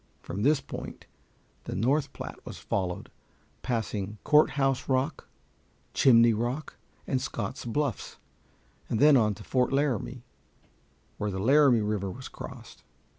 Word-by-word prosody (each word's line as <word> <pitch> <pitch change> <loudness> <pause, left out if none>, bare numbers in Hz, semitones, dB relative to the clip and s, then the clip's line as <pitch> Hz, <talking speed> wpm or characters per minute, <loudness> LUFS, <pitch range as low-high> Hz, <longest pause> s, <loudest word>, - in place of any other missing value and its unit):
From 100 - -5
this 145 +4 +3
point 140 - -8 0.6
the - - -4
North 135 +7 +1
Platte - - -8
was - - -8
followed, 90 -2 -3 0.5
passing 105 -4 -3
Courthouse 140 -3 +3
Rock, 135 +3 0 0.7
Chimney 115 -3 +6
Rock, 120 +7 -3 0.3
and 130 -2 -1
Scott's 115 +4 -4
Bluffs, 130 0 -2 0.7
and 110 - 0
then 150 +1 +7
on 105 -5 +3
to 105 - -11
Fort 125 +2 +1
Laramie, 130 -3 -1 1.0
where 105 - -1
the 95 - -4
Laramie 130 +2 +5
River 105 -2 -1
was 130 +7 -8
crossed. - - -10
125 Hz, 125 wpm, -28 LUFS, 105-140 Hz, 1.0 s, then